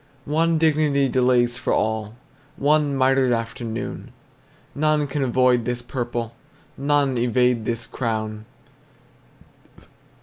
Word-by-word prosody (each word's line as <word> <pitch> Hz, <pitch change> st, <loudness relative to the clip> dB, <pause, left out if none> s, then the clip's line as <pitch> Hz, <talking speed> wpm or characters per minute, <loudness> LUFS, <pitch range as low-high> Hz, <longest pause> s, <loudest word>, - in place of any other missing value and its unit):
One 165 Hz, +2 st, +1 dB
dignity 150 Hz, -3 st, +2 dB
delays 125 Hz, -1 st, +2 dB
for -, -, -1 dB
all, 110 Hz, 0 st, -1 dB, 0.4 s
One 145 Hz, -1 st, +2 dB
mitred 130 Hz, -1 st, +3 dB
afternoon. 115 Hz, 0 st, -4 dB, 0.6 s
None 155 Hz, 0 st, +1 dB
can 145 Hz, +1 st, -3 dB
avoid 125 Hz, -1 st, +2 dB
this 120 Hz, 0 st, -3 dB
purple, 120 Hz, -2 st, -4 dB, 0.4 s
None 140 Hz, -2 st, +1 dB
evade 125 Hz, -1 st, +1 dB
this 115 Hz, 0 st, -3 dB
crown. 110 Hz, -3 st, -4 dB
125 Hz, 100 wpm, -22 LUFS, 115-140 Hz, 0.6 s, mitred